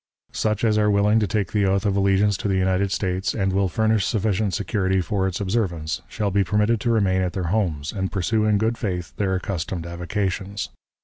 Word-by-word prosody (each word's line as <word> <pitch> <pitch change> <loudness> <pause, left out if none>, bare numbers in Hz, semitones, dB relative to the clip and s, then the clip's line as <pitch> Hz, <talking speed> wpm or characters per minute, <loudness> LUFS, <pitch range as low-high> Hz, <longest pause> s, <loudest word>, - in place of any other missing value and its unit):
"Such 110 0 -1
as 110 -2 +3
are 105 0 +3
willing 105 +2 +3
to 105 - +1
take 100 -1 -1
the 105 -2 +2
oath 100 +2 +1
of 100 -1 +1
allegiance 100 +1 +3
to - - -3
the 95 -1 +1
United 95 +1 +1
States, 95 0 -1
and 95 -3 0
will 95 -1 +2
furnish 110 +3 +1
sufficient 105 -2 0
security 95 -3 0
for 95 +1 0
its 95 - -3
observance, 95 -7 -1
shall 105 -2 -2
be 100 +1 +3
permitted 105 +4 +1
to 120 - 0
remain 100 -5 +2
at 90 -1 -1
their 90 -4 -2
homes, 80 -9 -1
and 95 -2 -3
pursue 105 +3 0
in 105 -1 +3
good 110 +3 0
faith 90 -6 -3
their 95 -2 0
accustomed 90 -2 -3
avocations. 95 +3 -3
100 Hz, 205 wpm, -23 LUFS, 95-105 Hz, -, as